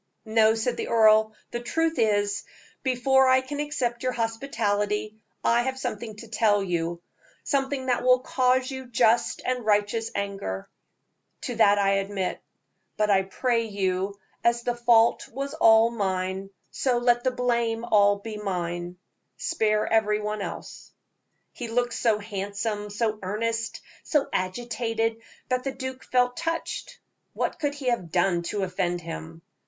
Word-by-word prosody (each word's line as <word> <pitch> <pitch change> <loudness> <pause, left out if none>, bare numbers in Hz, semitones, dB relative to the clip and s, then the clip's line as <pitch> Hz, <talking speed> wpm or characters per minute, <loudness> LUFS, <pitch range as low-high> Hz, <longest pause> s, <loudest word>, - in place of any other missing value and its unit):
"No," 220 0 +4
said 230 +2 -1
the - - -3
earl; 220 -1 +5 0.2
"the 240 - -3
truth 325 +5 -1
is, 205 -2 +1 0.4
before 265 +1 +3
I 260 0 +5
can 285 +2 -6
accept 250 -5 -2
your 255 0 -1
hospitality, 220 -3 -1 0.2
I 235 +1 +4
have 260 +1 -2
something 220 -3 -4
to 230 +2 -11
tell 210 -2 +2
you 170 -1 -2 0.4
something 270 -1 -1
that 250 -2 +1
will 250 0 +5
cause 255 0 +1
you 260 -1 -6
just 235 -1 +2
and 250 -1 -1
righteous 215 +1 +1
anger 195 - -3 0.7
to - - -3
that 205 0 +5
I 195 0 +3
submit; 195 -2 -3 0.6
but 210 -1 +2
I 195 -1 +5
pray 230 +4 0
you, 195 -1 -1 0.3
as 235 0 +2
the 245 - 0
fault 235 -1 +4
was 275 +3 -4
all 225 +1 +5
mine, 190 -2 -2 0.2
so 255 -3 +1
let 240 0 +3
the 255 - +3
blame 235 -2 0
be 235 - -7
all 205 -1 +4 0.2
mine. 175 -2 -3 0.4
Spare 215 -1 +1
every 210 -1 +2
one 210 0 -3
else." - - -7 0.6
He 240 - -6
looked 240 +1 0
so 225 -3 +2
handsome, 205 0 -4
so 215 +1 -1
earnest, 225 +4 -2 0.2
so 295 -3 +1
agitated, 225 +3 -1 0.3
that 255 0 0
the 270 - -2
duke 260 0 -6
felt 250 -1 +2
touched. 330 0 -3 0.4
What - - -2
could 290 -2 -1
he 275 -3 -2
have 210 -9 -1
done 175 0 +2
to 205 -2 -1
offend 180 -1 -1
him? 165 0 -8
225 Hz, 150 wpm, -26 LUFS, 200-245 Hz, 0.7 s, earl